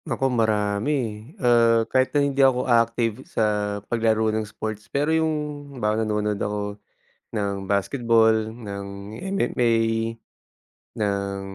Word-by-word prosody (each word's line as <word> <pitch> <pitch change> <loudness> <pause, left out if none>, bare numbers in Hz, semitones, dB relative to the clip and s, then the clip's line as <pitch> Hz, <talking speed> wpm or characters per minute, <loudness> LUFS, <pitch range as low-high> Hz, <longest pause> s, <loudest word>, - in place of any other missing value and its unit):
Naku 135 -1 0
marami 105 +1 +1
eh. 120 -5 -1 0.3
Ah 115 -1 +5
kahit 130 +2 +2
na 145 - +4
hindi 140 -1 +1
ako 130 -1 +4
active 115 -1 +2
sa - - 0 0.4
paglaro 110 -1 +1
ng 110 - 0
sports 110 0 -6
pero 145 +5 +1
yung 160 -1 +2 0.4
halimbawa 110 -1 0
nanonood 105 -1 -1
ako 105 0 -3 0.6
ng 100 -2 -3
basketball, 115 +2 +3 0.2
ng 100 -2 -8
MMA, 120 - 0 1.2
ng 100 -1 -1
110 Hz, 120 wpm, -24 LUFS, 105-120 Hz, 1.2 s, Ah